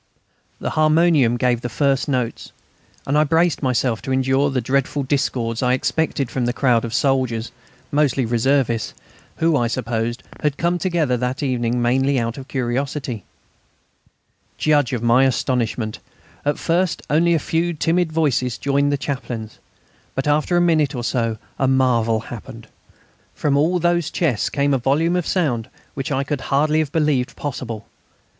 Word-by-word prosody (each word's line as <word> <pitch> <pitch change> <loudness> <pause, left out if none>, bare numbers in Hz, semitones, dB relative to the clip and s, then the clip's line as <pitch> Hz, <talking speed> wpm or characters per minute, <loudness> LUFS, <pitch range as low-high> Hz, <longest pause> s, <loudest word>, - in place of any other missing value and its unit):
The - - -3
harmonium 155 -5 +3
gave 120 -1 +1
the 120 - -4
first 140 +3 +1
notes, 125 -4 -2 0.5
and 140 - 0
I 150 - +5
braced 165 +2 +2
myself 125 -3 0
to 130 - -5
endure 130 +2 +2
the 135 -2 0
dreadful 135 +3 0
discords 125 -4 -1
I 125 -1 +2
expected 140 -1 -1
from 125 -2 -1
this 120 +1 -1
crowd 125 -4 +2
of 115 - -4
soldiers 125 -2 0 0.4
mostly 145 -3 +2
reservists 120 0 +1 0.4
who, 165 -1 +2
I 120 -4 +2
supposed, 120 0 -2 0.2
had 150 -1 -1
come 175 +1 0
together 165 -8 +1
that 125 +3 -2
evening 120 -2 0
mainly 135 +3 +2
out 115 +1 -2
of 135 - -10
curiosity. 130 -3 -3 1.3
Judge 145 -4 +2
of 120 -3 -2
my 120 +3 +5
astonishment! 120 -3 -1 0.5
At 145 - +1
first 175 +1 0
only 170 +3 +3
a - - +3
few 165 +3 0
timid 165 +2 +1
voices 135 -7 0
joined 140 0 +1
the 145 - +1
Chaplain's. 125 -6 -5 0.6
But 135 +2 -2
after 155 +4 +2
a - - +4
minute 155 -5 +2
or 120 - -3
so 115 -2 -1 0.2
a 135 - +2
marvel 120 -4 +2
happened. 115 -2 -9 0.7
From 145 -2 +1
all 160 +6 +2
those 175 -1 +1
chests 145 -11 0
came 140 0 +1
a 135 - +2
volume 150 +7 +1
of 180 -2 -1
sound 135 - 0 0.3
such 135 -1 -3
as 145 - 0
I 135 - 0
could 145 -1 -3
hardly 150 +3 +1
have 155 -3 -1
believed 150 -6 +1
possible. 120 -6 -5
135 Hz, 160 wpm, -21 LUFS, 120-150 Hz, 1.3 s, I